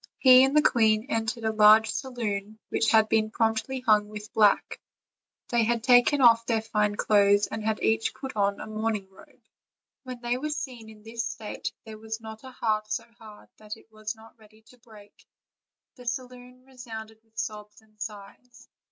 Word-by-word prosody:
He 255 -1 +7
and 270 +3 +2
the 300 - +5
queen 220 -1 +3
entered 225 -1 -2
a 220 - +1
large 215 +1 +6
saloon 215 -5 -4
which 225 - +1
had 220 -1 +4
been 220 0 +1
promptly 225 +4 -1
hung 210 -4 +2
with 210 0 -10
black; 210 -2 +2 0.7
they 235 -1 +2
had 230 0 0
taken 250 +3 +4
off 230 -2 +6
their 225 -2 0
fine 210 -2 0
clothes, 205 -1 +3
and 220 - -6
had 220 0 -1
each 225 0 +1
put 265 -3 -8
on 200 -1 0
a - - -6
mourning 215 -2 -3
robe. 190 - -19 0.6
When 255 -2 -8
they 240 +1 -1
were 305 +3 -3
seen 255 -7 -6
in 215 -1 -15
this 230 +1 -5
state 225 -1 -5
there 215 -1 -10
was 220 +1 -6
not 220 0 -10
a 260 - -9
heart 215 -4 -2
so - - -2 0.2
hard 215 -2 -14
that 215 0 -9
it 225 - -22
was 215 0 -6
not 225 +1 -18
ready 215 0 -21
to 250 - -20
break; 215 -4 -17 0.8
the 250 -2 -15
saloon 250 +1 -7
re 265 -1 -21
sounded 220 -3 -9
with 225 0 -37
sobs 210 -1 -6
and 215 -1 -28
sighs. 210 +4 -10
220 Hz, 185 wpm, -26 LUFS, 215-240 Hz, 0.8 s, He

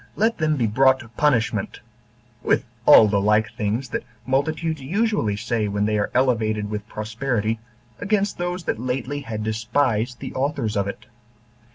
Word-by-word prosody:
let 225 0 +1
them 155 -1 +2
be 120 - +1
brought 130 +5 +4
to 120 - -11
punishment, 115 -6 0 0.6
with - - +1 0.2
all 110 - +9
the 100 -1 +1
like 105 +1 +2
things 115 +3 -2
that - - -3 0.2
multitudes 155 +4 -1
usually 185 - 0
say 110 0 -1
when 100 0 0
they 105 0 +1
are 105 -1 0
elevated 110 -5 +1
with 105 0 -4
prosperity, 110 0 -2 0.4
against 205 -2 0
those 175 0 -2
that 110 - -2
lately 130 +3 -2
had 110 -5 -5
despised 115 +1 0
the - - -6
authors 130 -5 -1
of 100 -1 0
it. 100 - -7
120 Hz, 160 wpm, -23 LUFS, 105-145 Hz, 0.6 s, all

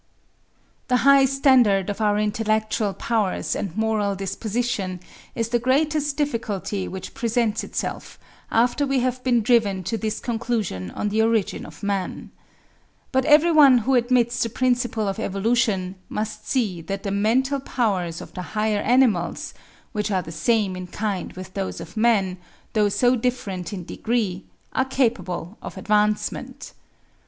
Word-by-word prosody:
The 250 - +3
high 275 -1 +7
standard 255 -8 +4
of 205 - -6
our 210 -1 +2
intellectual 215 0 0
powers 205 -8 -1
and 195 -1 -4
moral 215 -2 +1
disposition 195 -1 -2 0.4
is 230 -1 -1
the 240 0 +2
greatest 290 +3 +1
difficulty 215 -8 -2
which 190 0 -7
presents 230 -3 0
itself, - - -5 0.3
after 245 +5 +2
we 270 -2 +1
have 255 0 -1
been 240 -3 +2
driven 210 -5 +2
to 225 +5 -2
this 215 -1 -2
conclusion 225 - -2
on 210 - -3
the 215 +2 +1
origin 225 -3 0
of - - -14
man. 200 -2 -3 0.8
But 265 0 +2
every 305 +3 +6
one 285 -5 +7
who 270 - +2
admits 240 -1 +2
the 230 - +1
principle 240 -3 0
of 195 - -2
evolution, 200 -2 0 0.2
must 215 0 -4
see 210 -10 0
that 195 +4 -5
the 200 - -2
mental 250 +8 +1
powers 195 -11 -1
of - - -11
the 180 - -5 0.2
higher 210 -1 +1
animals, 235 -9 +2 0.4
which 210 -1 -2
are 190 -3 0
the 165 - -8
same 195 +3 +1
in 185 0 -6
kind 200 -1 -3
with 185 0 -9
those 195 -1 -3
of - - -10
man, 205 -5 +2 0.3
though 210 -2 +3
so 245 +5 +3
different 220 -7 -2
in 185 -4 -6
degree, 210 -5 -2 0.3
are 260 - +2
capable 205 -8 -1
of - - -8
advancement. 210 0 -1
220 Hz, 150 wpm, -23 LUFS, 195-245 Hz, 0.8 s, high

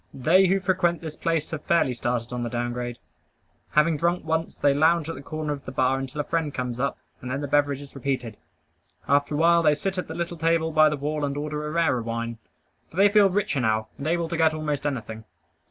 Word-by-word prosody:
They 175 +8 +4
who 195 +2 +2
frequent 180 -2 +1
this 160 -2 -6
place 165 -2 -1
have 155 -2 -4
fairly 170 -7 +2
started 120 0 -2
on 125 - -3
the 120 - -2
down 120 0 -2
grade. 120 -1 -4 0.8
Having 150 +1 +3
drunk 170 +2 0
once, 160 +1 -1
they 140 - +3
lounge 160 +2 +3
at 165 - -3
the 135 - -9
corner 155 +1 -3
of 140 -1 -8
the - - -6
bar 130 0 +1
until 135 +2 -6
a - - +1
friend 160 -1 -1
comes 125 -2 -4
up, 140 - -1 0.2
and 125 - -6
then 140 +2 -2
the 145 - -3
beverage 145 0 +1
is 140 - -14
repeated. 125 -4 -3 0.7
After 145 +1 +2
a - - 0
while 170 +2 +5
they 150 -2 +4
sit 190 +5 -3
at - - -4
the 160 - -6
little 170 0 -3
table 165 0 +1
by 155 0 +5
the 150 - -2
wall 150 +1 -2
and 140 0 -2
order 150 0 -3
a - - -4
rarer 160 -7 +1
wine; 115 0 -4 0.5
for - - -16
they 200 +1 +6
feel 205 -1 +5
richer 195 -6 0
now, 110 -1 0
and 140 - -4
able 170 0 0
to 170 - -3
get 160 -1 +3
almost 150 -2 -2
anything. 110 -5 -5
150 Hz, 235 wpm, -25 LUFS, 130-165 Hz, 0.8 s, they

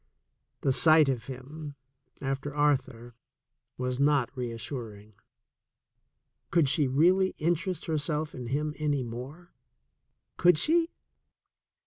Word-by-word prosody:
The 135 - +2
sight 155 +1 +5
of 120 -4 -2
him, 140 +3 -8 0.5
after 135 +1 -3
Arthur, 130 -5 0 0.6
was 125 0 -2
not 140 -3 +2
reassuring. 115 -3 -6 1.4
Could 170 -4 +3
she 140 +1 +2
really 180 +8 +3
interest 175 +3 -1
herself 155 -1 -2
in 125 -2 -7
him 150 +4 -1
any 145 -3 0
more? 130 +9 -9 0.8
Could 175 -2 +5
she? 330 - +2
145 Hz, 100 wpm, -28 LUFS, 125-155 Hz, 1.4 s, sight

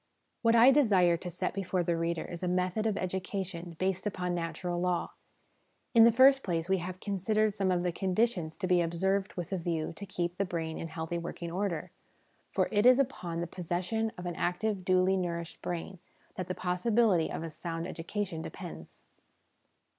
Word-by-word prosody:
What 230 -1 +4
I 235 +3 +8
desire 200 -11 +4
to 180 - -6
set 175 - -3
before 185 -2 -1
the 170 0 +1
reader 165 0 -1
is 175 - -7
a 180 - -1
method 185 +4 0
of 210 -2 0
education 185 -2 -4
based 190 +2 -1
upon 180 -3 -2
natural 175 +1 -3
law. 180 -1 0 0.8
In 230 -2 +8
the 235 - +7
first 270 +3 +6
place, 170 -5 -2
we 190 0 +2
have 180 +1 -6
considered 210 +2 +1
some 195 -2 0
of 180 -1 +1
the 180 - +1
conditions 185 -2 0
to - - -2
be 180 -1 +4
observed 190 +4 0
with 175 -1 -5
a 190 - 0
view 165 -1 -2
to 200 - -6
keep 175 -1 -3
the - - +3
brain 165 -4 -3
in 165 - -4
healthy 165 +1 -4
working 170 0 -6
order; 180 -3 -2 0.6
for - - +1
it 210 +2 +4
is 255 0 +8
upon 180 -11 -1
the - - -1
possession 180 +6 -2
of 180 - -7
an 175 -1 -3
active, 190 +2 -1
duly 185 +1 +3
nourished 170 -3 -3
brain 175 +1 -4 0.3
that 185 -2 -5
the 185 - -3
possibility 185 -1 +2
of - - -4
a 165 - -5
sound 165 +1 -5
education 175 0 -4
depends. - - -9
180 Hz, 185 wpm, -30 LUFS, 170-200 Hz, 0.8 s, I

